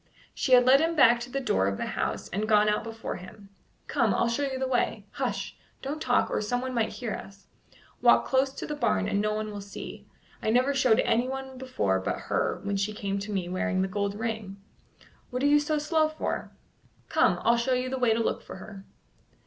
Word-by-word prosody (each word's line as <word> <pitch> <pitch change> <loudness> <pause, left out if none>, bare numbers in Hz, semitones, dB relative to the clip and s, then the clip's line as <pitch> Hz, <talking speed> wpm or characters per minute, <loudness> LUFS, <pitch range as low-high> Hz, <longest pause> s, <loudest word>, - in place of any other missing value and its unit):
She 260 - 0
had 250 0 +7
led 265 +2 +7
him 330 +1 +1
back 240 -5 +6
to 240 +1 -7
the 275 - -1
door 95 - +1
of 100 0 -1
the - - -2
house - - -3
and 210 +3 -2
gone 210 -1 +5
out 210 0 +1
before 225 0 -5
him. 195 +2 -12 0.4
"Come, - - +1
I'll 235 - +2
show 235 +5 -1
you 270 -2 -1
the 260 0 -1
way. 255 -2 0
Hush! - - -3 0.3
don't 290 +3 -4
talk, 245 -3 +2
or - - 0
someone 245 +4 -2
might 230 -3 +1
hear 230 -4 -4
us. 195 0 -9 0.6
Walk - - +5
close 265 0 +2
to - - -6
the 300 - -4
barn, 95 - +1
and 200 - +1
no 215 0 0
one 215 0 -3
will 205 -1 -6
see. 200 0 -9 0.3
I - - -1
never 255 +5 +3
showed 255 -5 +4
anyone 265 +2 -1
before 105 - 0
but 95 - -2
her - - 0
when 200 0 -1
she 200 +2 -1
came 200 -1 -3
to 205 +2 -6
me 190 -3 -2
wearing 185 +1 0
the - - 0
gold 200 +1 -2
ring. 220 -3 -4 0.7
What 250 +1 -3
are - - +3
you 295 +1 +6
so 300 +1 0
slow 310 +1 +2
for? 310 - -3 0.6
Come, - - +3
I'll 235 - +5
show 245 +2 +1
you 250 0 -1
the 260 0 -3
way 245 -3 +3
to 220 - +2
look - - -1
for - - -10
her." 195 -2 -10
230 Hz, 220 wpm, -27 LUFS, 200-260 Hz, 0.7 s, had